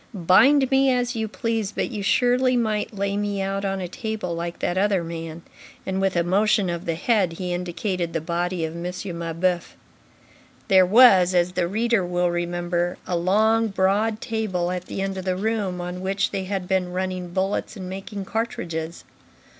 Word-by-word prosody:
Bind 260 - +5
me 270 0 +4
as 245 0 0
you 220 -1 -1
please, 225 -1 -2
but - - -2
you 210 -3 -4
surely 250 +4 +3
might 215 -3 0
lay 200 -1 -2
me 205 -1 -1
out 195 +1 -2
on 195 -1 -1
a 180 - -3
table 220 -3 -4
like 170 0 -4
that 175 - -1
other 195 -2 +2
man." 165 0 -7 0.4
And 190 0 -2
with 195 -1 +1
a 170 - +2
motion 200 +1 +2
of 170 0 -5
the 165 - -1
head, 190 -1 +1
he 180 +1 -4
indicated 175 0 -2
the 165 - -1
body 170 +1 -2
of 160 +1 -6
M. 170 - -6 0.4
Mabeuf. 170 +1 -1 0.9
There 190 -2 +6
was, 190 -5 +6
as 175 0 +3
the 180 -1 0
reader 225 +1 +1
will 175 0 0
remember, 175 0 -1
a 180 - -2
long, 220 +6 +3
broad 210 +3 +1
table 205 -7 -2
at 180 0 -4
the 195 - -4
end 195 0 -3
of 185 - -7
the 185 -1 0
room, 205 -3 -1
on 180 +1 -5
which 195 +1 0
they 195 -2 -3
had 190 -1 -3
been 185 -1 0
running 185 -1 -3
bullets 190 +5 -2
and 185 -2 -6
making 195 +1 -6
cartridges. 170 -7 -4
190 Hz, 185 wpm, -23 LUFS, 175-210 Hz, 0.9 s, There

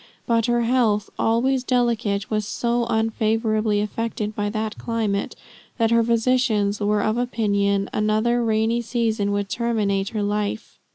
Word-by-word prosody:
But 230 -1 +1
her 240 0 +2
health, 230 -4 +1
always 250 +3 +1
delicate, 230 -5 0
was 215 -1 -1
so 235 +1 -1
unfavorably 220 -1 +1
affected 215 0 -3
by 205 0 -1
that 215 0 -4
climate 220 -4 -2 0.4
that 225 -2 +2
her 230 0 +4
physicians 230 -3 +1
were 210 0 +1
of 220 +2 0
opinion 200 -5 0
another 215 +3 +1
rainy 225 +1 +1
season 225 -3 -1
would 205 0 -1
terminate 205 -4 -1
her 215 -2 -2
life. 210 +1 -3
220 Hz, 135 wpm, -23 LUFS, 210-235 Hz, 0.4 s, her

